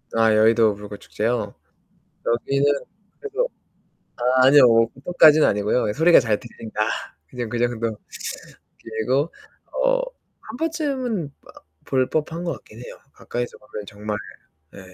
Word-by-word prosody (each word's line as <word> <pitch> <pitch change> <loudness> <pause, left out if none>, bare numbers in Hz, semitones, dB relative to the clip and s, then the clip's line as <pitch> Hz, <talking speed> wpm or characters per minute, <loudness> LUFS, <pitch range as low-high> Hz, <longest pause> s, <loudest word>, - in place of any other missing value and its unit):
아, 115 -1 +4
여의도 110 0 +4
불꽃 105 0 -9
축제요? 110 -1 -2 0.7
여기는 140 +4 +1 0.5
그래도 450 +4 -2 0.7
아, 130 +1 +3
아니요. 140 -1 +8
뭐 115 -1 +5
고통까지는 155 +3 +4
아니고요. 105 +2 +1
소리가 165 +6 +6
잘 110 -5 0
들린다. 115 -3 -7 0.5
그냥 125 -2 -5
그 120 +1 -3
정도. 115 -2 -1 0.9
그리고 130 +8 0 0.5
어 - - +3 0.5
1 220 - -7
번쯤은 265 - -2
어 - - -17 0.2
볼 130 -1 +1
법한 160 +2 -2
것 170 - -1
같긴 110 - -14
해요. - - -10
가까이서 120 0 -5
보면 105 -5 -9
정말 105 +1 -5 0.6
네. - - -13
120 Hz, 265 characters per minute, -22 LUFS, 110-155 Hz, 0.9 s, 아니요